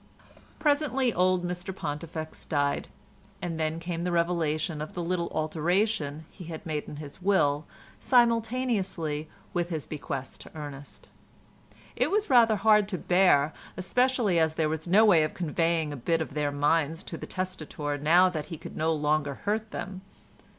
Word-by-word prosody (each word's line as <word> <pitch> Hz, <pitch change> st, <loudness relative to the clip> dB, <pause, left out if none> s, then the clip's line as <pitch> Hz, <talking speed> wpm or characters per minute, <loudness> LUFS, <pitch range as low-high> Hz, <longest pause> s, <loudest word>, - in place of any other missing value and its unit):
Presently 285 Hz, -5 st, +2 dB
old 180 Hz, 0 st, +2 dB
Mr 180 Hz, +2 st, -5 dB
Pontifex 155 Hz, 0 st, -5 dB
died, 145 Hz, -2 st, 0 dB, 0.5 s
and 165 Hz, -2 st, -4 dB
then 160 Hz, +1 st, -1 dB
came 170 Hz, 0 st, -4 dB
the 180 Hz, -, -1 dB
revelation 165 Hz, -2 st, 0 dB
of 155 Hz, -, -7 dB
the 175 Hz, -, -2 dB
little 170 Hz, 0 st, -1 dB
alteration 160 Hz, 0 st, 0 dB
he 180 Hz, -, -11 dB
had 160 Hz, -1 st, -7 dB
made 155 Hz, -2 st, -3 dB
in -, -, -7 dB
his 150 Hz, +4 st, -9 dB
will 155 Hz, -6 st, +2 dB, 0.3 s
simultaneously 225 Hz, -, +1 dB, 0.2 s
with 175 Hz, -1 st, -1 dB
his 160 Hz, -4 st, -3 dB
bequest 135 Hz, -3 st, -6 dB
to -, -, -12 dB
Ernest. 145 Hz, -2 st, -9 dB, 0.9 s
It -, -, +1 dB
was 420 Hz, -3 st, 0 dB
rather 230 Hz, -3 st, +6 dB
hard 210 Hz, 0 st, +4 dB
to 185 Hz, -, -2 dB
bear, 175 Hz, -5 st, +3 dB, 0.2 s
especially 235 Hz, -1 st, +2 dB
as 160 Hz, -1 st, +2 dB
there 155 Hz, -1 st, +1 dB
was 160 Hz, +2 st, -3 dB
no 205 Hz, +5 st, +6 dB
way 180 Hz, -7 st, +6 dB
of 155 Hz, -, -1 dB
conveying 165 Hz, -2 st, 0 dB
a -, -, -6 dB
bit 165 Hz, +7 st, 0 dB
of 160 Hz, -3 st, -4 dB
their 145 Hz, -1 st, 0 dB
minds 150 Hz, +3 st, +1 dB
to -, -, -6 dB
the -, -, -7 dB
testator 155 Hz, -5 st, -4 dB
now 170 Hz, +5 st, +5 dB
that 160 Hz, -5 st, -3 dB
he 165 Hz, -, -6 dB
could -, -, -10 dB
no 160 Hz, +1 st, +1 dB
longer 150 Hz, -2 st, 0 dB
hurt 215 Hz, +1 st, 0 dB
them. 190 Hz, -2 st, -6 dB
170 Hz, 165 wpm, -28 LUFS, 155-190 Hz, 0.9 s, rather